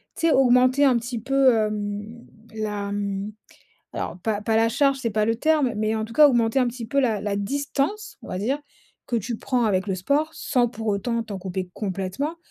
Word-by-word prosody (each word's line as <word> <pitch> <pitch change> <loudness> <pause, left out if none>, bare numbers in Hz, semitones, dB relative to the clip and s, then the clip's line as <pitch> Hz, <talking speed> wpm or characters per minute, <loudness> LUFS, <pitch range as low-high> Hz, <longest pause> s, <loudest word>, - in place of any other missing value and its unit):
tu 330 - +1
sais? 320 - +4
Augmenter 255 +1 +4
un 255 -3 +4
petit 235 0 -4
peu, 270 +2 +3
hem, 210 +1 -3 0.3
la 210 -2 -3
mmh, 200 0 -3 0.6
alors, - - -4
pas 215 -1 -1
pas 220 +1 0
la 225 +1 +4
charge, 275 +2 +2
c'est 240 -3 -2
pas 215 0 +1
le 225 - +2
terme, 295 -2 +2
mais 215 +1 0
en 220 - -2
tout 225 - -9
cas, 300 +2 +8
augmenter 235 -2 +2
un 250 - +2
petit 240 -1 -6
peu 275 +5 +1
la 225 -6 +1
la 205 0 -2
distance, 280 - -2
on - - -11
va 185 - -3
dire 250 +9 -1 0.5
que 240 - 0
tu 230 +2 -3
prends 245 +1 0
avec 195 -3 +1
le 190 - 0
sport, 285 - 0
sans 245 -2 +1
pour 225 -1 -7
autant 230 +3 0
t'en 210 -3 -6
couper 185 -1 -5
complètement. 200 - -3
225 Hz, 210 wpm, -24 LUFS, 205-260 Hz, 0.6 s, cas